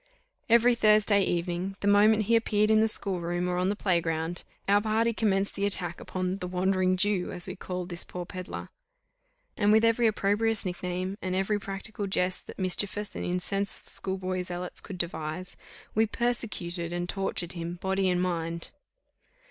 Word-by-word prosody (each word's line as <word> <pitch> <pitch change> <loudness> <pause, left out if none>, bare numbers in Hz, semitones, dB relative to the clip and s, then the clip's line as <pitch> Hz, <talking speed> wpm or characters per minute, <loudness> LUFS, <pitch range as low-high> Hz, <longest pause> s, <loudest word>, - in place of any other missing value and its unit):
Every 235 +2 +6
Thursday 215 -2 +4
evening, 175 +2 -1
the 200 - -1
moment 210 +2 +5
he 230 +3 +3
appeared 215 -1 +2
in 215 - +5
the 220 - +4
school 195 -4 0
room, 175 +1 -1
or 180 0 -1
on 180 +1 +1
the 205 - 0
play 180 -4 +1
ground, 165 +1 -2 0.2
our 205 +1 +4
party 225 +2 +1
commenced 200 -3 +1
the 200 0 0
attack 175 -3 -1
upon 185 +1 -3
"the 180 - -4
Wandering 185 0 +1
Jew," 200 -1 +1
as 180 - -6
we 185 - -6
called 180 -1 -5
this 175 -1 -3
poor 180 -1 -6
pedlar; 185 +1 -7 0.9
and 205 -1 +3
with 220 +1 +5
every 230 +1 +4
opprobrious 215 +1 +1
nickname, 185 +2 -3
and 185 0 -2
every 195 +2 +1
practical 200 +1 -4
jest, 185 -1 -1
that - - -10
mischievous 200 +2 0
and - - -4
incensed 190 +2 -1
schoolboy 185 -1 0
zealots 180 0 -4
could 190 - -8
devise, 170 +1 -2 0.4
we 220 +1 +3
persecuted 195 -8 -1
and 175 0 -2
tortured 185 -2 -1
him 170 -1 -5
body 190 +1 0
and 180 0 +1
mind. 170 -2 -3
190 Hz, 170 wpm, -28 LUFS, 180-210 Hz, 0.9 s, Every